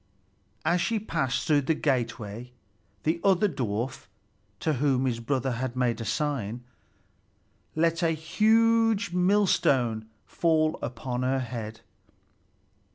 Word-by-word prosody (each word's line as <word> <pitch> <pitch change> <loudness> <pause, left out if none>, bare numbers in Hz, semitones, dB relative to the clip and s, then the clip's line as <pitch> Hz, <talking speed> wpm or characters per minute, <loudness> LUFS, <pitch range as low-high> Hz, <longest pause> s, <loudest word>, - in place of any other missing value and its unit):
As 170 +2 +2
she 230 - 0
passed 155 - -1
through 150 -2 +3
the 155 +4 0
gateway, 120 -4 -2 0.5
the 165 +2 0
other 195 +1 +4
dwarf, 125 - -3 0.5
to 155 - +1
whom 135 -3 +2
his 120 -3 -1
brother 130 +2 -1
had 125 +1 -3
made 120 -2 0
a - - -4
sign, 120 -2 -2 1.1
let 165 +2 +1
a 165 - +3
huge 225 +6 +2
millstone 140 - +2 0.2
fall 160 -2 +1
upon 125 +1 -4
her 130 +1 +1
head. 115 -2 -6
135 Hz, 115 wpm, -27 LUFS, 120-170 Hz, 1.1 s, other